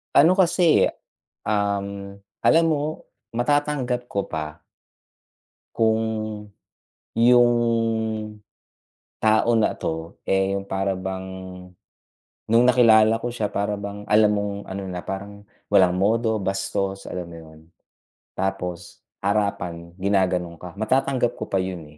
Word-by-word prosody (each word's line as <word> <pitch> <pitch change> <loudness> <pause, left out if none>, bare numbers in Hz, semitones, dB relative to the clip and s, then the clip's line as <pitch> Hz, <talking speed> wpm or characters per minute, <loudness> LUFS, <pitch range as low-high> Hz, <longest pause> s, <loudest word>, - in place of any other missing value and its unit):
Ano 160 +6 +7
kasi, 175 -3 +4 0.6
um, 100 -1 -2 0.2
alam 165 0 +5
mo 155 0 -1 0.2
matatanggap 125 -1 0
ko 100 -1 -2
pa 75 -1 -6 1.1
kung 110 -1 +2 1.2
yung 120 +1 +6 1.7
tao 110 +2 +3
na 110 - +2
'to, 80 +2 -5
eh, 95 0 +2
yung 100 - -4
para 95 0 -1
bang 95 0 -5 1.2
nung 115 +2 +5
nakilala 115 -3 +5
ko 120 - -4
siya 110 -4 -2
para 100 +1 -1
bang 100 0 -7
alam 105 0 +5
mong 100 -1 -1 0.2
ano, 100 +1 -4
na 90 -1 -5
parang 100 +1 -7 0.3
walang 95 -3 +5
modo 110 +2 +2
bastos, 95 0 -2
alam 90 -1 -5
mo 85 - -10
yun, 80 -1 -14 0.8
tapos 90 -2 -4 0.2
harapan 90 -4 -1
ginaganon 90 -3 +1
ka. 90 +1 -10
Matatanggap 130 +1 +1
ko - - -4
pa 95 - +1
yun, 90 -3 -5
100 Hz, 115 wpm, -23 LUFS, 95-115 Hz, 1.7 s, Ano